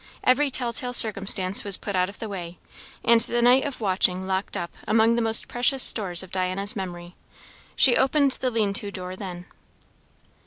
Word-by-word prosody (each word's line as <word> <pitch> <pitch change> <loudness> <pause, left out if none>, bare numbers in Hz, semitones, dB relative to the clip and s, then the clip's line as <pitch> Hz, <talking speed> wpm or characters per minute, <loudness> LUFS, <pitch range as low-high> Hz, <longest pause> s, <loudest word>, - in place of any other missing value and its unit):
Every 280 +3 +2
tell 245 -2 -3
tale 250 0 -5
circumstance 195 -4 +2
was 200 -2 +5
put 200 - -6
out 180 0 0
of 200 - -13
the 225 - -7
way, 180 -4 -8 0.5
and 230 0 +4
the 240 +1 -1
night 250 +2 +4
of 280 -3 -6
watching 185 -2 +1
locked 190 +1 -4
up 170 - -6 0.2
among 225 +1 +2
the 235 - -1
most 225 0 +2
precious 250 +2 +1
stores 190 -5 +4
of 185 - -14
Diana's 190 +2 -2
memory. 175 -3 -8 0.6
She 250 -3 +5
opened 275 +1 +1
the 255 - 0
lean 215 -4 -2
to 200 +1 -2
door 185 -2 -8
then. 180 -2 -9
200 Hz, 185 wpm, -23 LUFS, 185-240 Hz, 0.6 s, was